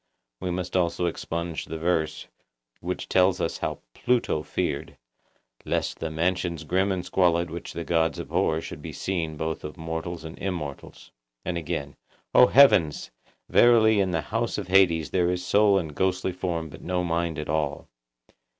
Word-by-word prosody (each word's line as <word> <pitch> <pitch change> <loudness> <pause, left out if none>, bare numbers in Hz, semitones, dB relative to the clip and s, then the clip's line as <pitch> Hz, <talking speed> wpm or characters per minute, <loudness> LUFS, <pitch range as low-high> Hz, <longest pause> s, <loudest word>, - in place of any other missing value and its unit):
We 90 - -3
must 90 +1 -3
also 90 -1 +1
expunge 85 -1 -3
the 80 - -6
verse, 80 -1 -1 0.5
which 90 +2 -4
tells 95 0 +3
us - - -2
how - - -3
Pluto 120 -10 +1
feared, 75 0 -3 0.7
'Lest - - -2
the 80 - -3
mansions 85 0 -1
grim 95 +5 +1
and 90 -1 -2
squalid 85 -2 +2
which 85 0 -7
the 85 - -4
gods 80 -1 +1
abhor 80 0 0
should - - -8
be - - -7
seen 80 -5 -3
both 80 +1 -3
of 75 +3 -7
mortals 80 +1 -5
and 80 +1 -9
immortals.' 85 -8 -6 0.3
And 90 - -2
again:— 75 -3 -4 0.4
'O 125 - +8
heavens! 95 - +5 0.4
verily 110 -3 +5
in 95 -1 +2
the 85 -3 0
house - - -2
of - - -5
Hades 85 -5 +4
there 90 -2 +2
is 90 0 -2
soul 100 +1 +4
and 80 -5 -3
ghostly 95 +2 0
form 85 -3 -3
but - - -12
no 90 0 -1
mind 85 -2 -1
at 75 - -4
all! 75 -2 -2
85 Hz, 165 wpm, -26 LUFS, 80-90 Hz, 0.7 s, O